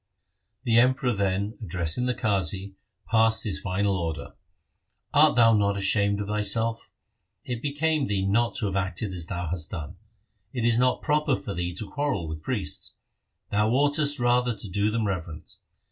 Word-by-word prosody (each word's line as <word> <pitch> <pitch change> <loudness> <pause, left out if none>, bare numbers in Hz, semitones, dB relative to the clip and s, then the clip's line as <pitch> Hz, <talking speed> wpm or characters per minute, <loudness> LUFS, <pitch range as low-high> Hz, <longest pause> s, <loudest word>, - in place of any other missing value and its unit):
The 115 -1 +4
Emperor 130 +1 +3
then, 100 +1 -1
addressing 90 +4 0
the 125 - 0
Qazi, 95 -1 -1 0.3
passed 110 0 +3
his 105 -4 -2
final 100 +1 0
order: 80 -5 -4 0.4
' - - -44
Art 150 +1 +6
thou 115 -2 +6
not 100 -2 +2
ashamed 100 +1 +1
of 105 - -2
thyself? 110 +2 -1 0.5
It 120 -2 -4
became 150 0 0
thee 95 -2 0
not 115 +4 +1
to 110 - -1
have 95 -2 -2
acted 95 +1 -2
as 85 -3 -4
thou 90 -3 -3
hast 80 -2 -2
done. 80 -8 -6 0.6
It 120 -3 -1
is 120 0 +3
not 125 0 +2
proper 150 -2 +2
for 100 - -5
thee 85 0 -3
to 105 +2 -3
quarrel 145 - -2
with 80 0 -6
priests. 100 - -4 0.6
Thou 105 +1 +2
oughtest 145 +3 +2
rather 120 0 +2
to 105 - -8
do 100 +3 0
them 110 0 -1
reverence. 85 -5 -5
105 Hz, 170 wpm, -26 LUFS, 95-120 Hz, 0.6 s, Art